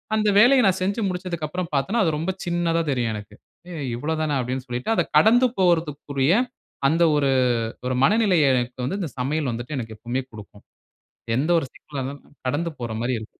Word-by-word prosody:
அந்த 215 Hz, -1 st, +2 dB
வேலைய 250 Hz, +3 st, +6 dB
நான் 190 Hz, 0 st, +1 dB
செஞ்சி 200 Hz, +4 st, 0 dB
முடிச்சதுக்கு 175 Hz, -4 st, -4 dB
அப்புறம் 180 Hz, +1 st, -4 dB
பார்த்தான்னா, 195 Hz, +11 st, +1 dB
அது 160 Hz, -, +1 dB
ரொம்ப 170 Hz, +5 st, -2 dB
சின்னதா 170 Hz, -1 st, 0 dB
தெரியும் 120 Hz, -4 st, 0 dB
எனக்கு 105 Hz, -1 st, -9 dB, 0.4 s
ஏய் 145 Hz, -5 st, -4 dB
இவ்வளவு 155 Hz, +6 st, -2 dB
தானா? 150 Hz, -3 st, 0 dB
அப்பிடின்னு 125 Hz, +1 st, -4 dB
சொல்லிட்டு. 125 Hz, -, -3 dB
அத -, -, +2 dB
கடந்து 245 Hz, +3 st, +6 dB
போறதற்குரிய 150 Hz, -4 st, +1 dB, 0.5 s
அந்த 165 Hz, +3 st, +3 dB
ஒரு 145 Hz, -1 st, +2 dB, 0.6 s
ஒரு 130 Hz, -, 0 dB
மனநிலை 210 Hz, -2 st, +3 dB, 0.2 s
எனக்கு 125 Hz, 0 st, -1 dB
வந்து 180 Hz, +10 st, -2 dB
இந்த 175 Hz, -, -2 dB
சமையல் 145 Hz, +2 st, -1 dB
வந்துட்டு 120 Hz, +6 st, -5 dB
எனக்கு 110 Hz, -2 st, -6 dB
எப்பவுமே 120 Hz, +4 st, -3 dB
குடுக்கும். 105 Hz, -1 st, -13 dB, 0.7 s
எந்த 150 Hz, +6 st, 0 dB
ஒரு 160 Hz, -, -1 dB
சிக்கல்லா 140 Hz, -3 st, -7 dB
இருந்தாலும் 140 Hz, +2 st, -9 dB
கடந்து 150 Hz, +6 st, -1 dB
போற 115 Hz, -2 st, -4 dB
மாரி 125 Hz, +2 st, 0 dB
இருக்கும். 110 Hz, -, -8 dB
150 Hz, 180 wpm, -23 LUFS, 125-180 Hz, 0.7 s, வேலைய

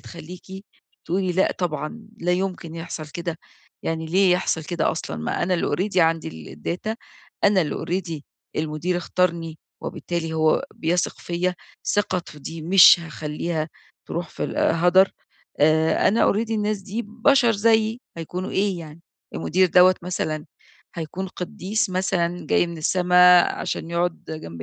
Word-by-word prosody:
تخليكِ 175 Hz, -, -10 dB, 0.4 s
تقولي 185 Hz, +2 st, 0 dB
لأ، 190 Hz, +2 st, +2 dB
طبعًا 175 Hz, +5 st, -4 dB
لا 175 Hz, -1 st, 0 dB
يمكن 180 Hz, -3 st, -2 dB
يحصل 165 Hz, -2 st, -6 dB
كده، 170 Hz, +1 st, -5 dB, 0.5 s
يعني 160 Hz, 0 st, -2 dB
ليه 185 Hz, +2 st, +4 dB
يحصل 175 Hz, -3 st, 0 dB
كده 170 Hz, 0 st, 0 dB
أصلًا 160 Hz, -, -4 dB
ما 80 Hz, 0 st, -2 dB
أنا 180 Hz, +1 st, +1 dB
اللي 170 Hz, -, 0 dB
already 195 Hz, +4 st, -2 dB
عندي 160 Hz, -, 0 dB
الdata 180 Hz, -, -3 dB, 0.5 s
أنا 200 Hz, -3 st, +5 dB
اللي 150 Hz, -, -3 dB
already 170 Hz, -4 st, -2 dB, 0.4 s
المدير 155 Hz, +3 st, -1 dB
اختارني، 170 Hz, -2 st, -1 dB, 0.2 s
وبالتالي 170 Hz, -2 st, -4 dB
هو 155 Hz, -1 st, +2 dB
بيثق 175 Hz, +2 st, -1 dB
فيَّ، 175 Hz, +1 st, -1 dB, 0.3 s
ثقته 185 Hz, -6 st, -1 dB
دي 160 Hz, +2 st, -7 dB
مش 180 Hz, 0 st, +8 dB
هاخلّيها 155 Hz, 0 st, -4 dB, 0.4 s
تروح 170 Hz, -1 st, -3 dB
في -, -, -4 dB
ال -, -, -5 dB
هدر. 180 Hz, +3 st, +4 dB, 0.5 s
آآ، 160 Hz, +1 st, +4 dB
أنا 220 Hz, +4 st, +3 dB
already 225 Hz, +2 st, -2 dB
الناس 215 Hz, -1 st, 0 dB
دي 210 Hz, +5 st, -4 dB
بشر 240 Hz, +2 st, +3 dB
زيي، 220 Hz, +2 st, +2 dB, 0.2 s
هيكونوا 180 Hz, +3 st, -5 dB
إيه 195 Hz, -2 st, 0 dB
يعني؟ 160 Hz, -1 st, -10 dB, 0.3 s
المدير 185 Hz, +1 st, +2 dB
دَوَّة 180 Hz, +2 st, +6 dB
مثلًا 155 Hz, -4 st, -3 dB, 0.5 s
هيكون 175 Hz, +3 st, -5 dB
قديس 185 Hz, +3 st, -2 dB
مثلًا 180 Hz, -1 st, -1 dB
جاي -, -, +3 dB
من 170 Hz, -1 st, -7 dB
السما 180 Hz, +2 st, +6 dB
عشان 165 Hz, -, -3 dB
يقعد 170 Hz, 0 st, -1 dB
جنب 85 Hz, -, -7 dB
175 Hz, 140 wpm, -23 LUFS, 160-190 Hz, 0.5 s, مش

